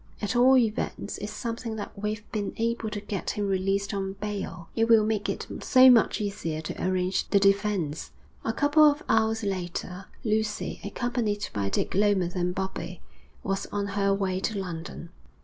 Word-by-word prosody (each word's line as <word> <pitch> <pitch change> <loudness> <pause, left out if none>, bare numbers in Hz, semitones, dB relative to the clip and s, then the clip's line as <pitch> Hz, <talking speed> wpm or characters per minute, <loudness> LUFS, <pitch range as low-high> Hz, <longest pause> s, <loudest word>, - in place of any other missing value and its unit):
'At 205 +2 -2
all 255 +2 +6
events 225 -4 -1
it's 210 - -5
something 230 +1 -4
that 210 - -6
we've 210 +1 -3
been 205 -2 -2
able 230 -1 -1
to 210 - -4
get 200 -2 -4
him 205 -1 -1
released 195 +1 0
on 195 -1 -2
bail. 195 -5 -5
It 225 - +3
will 225 -2 +6
make 215 -2 -1
it - - -3 0.2
so 260 0 +7
much 230 -3 +4
easier 200 -7 -3
to 160 - -5
arrange 185 0 0
the 200 - +4
defence.' 195 -6 +1 0.3
A - - 0
couple 290 +6 +3
of 290 +1 -2
hours 225 0 +2
later 185 -1 -4 0.2
Lucy, 215 -1 -1
accompanied 215 -1 -2
by 100 -2 -1
Dick - - -1
Lomas 195 -3 +2
and 180 0 -1
Bobbie, 190 -2 -4 0.4
was 195 0 -2
on 200 -1 -3
her 200 0 +1
way 195 -2 0
to 210 +2 -2
London. 170 -2 -6
205 Hz, 170 wpm, -27 LUFS, 190-220 Hz, 0.4 s, so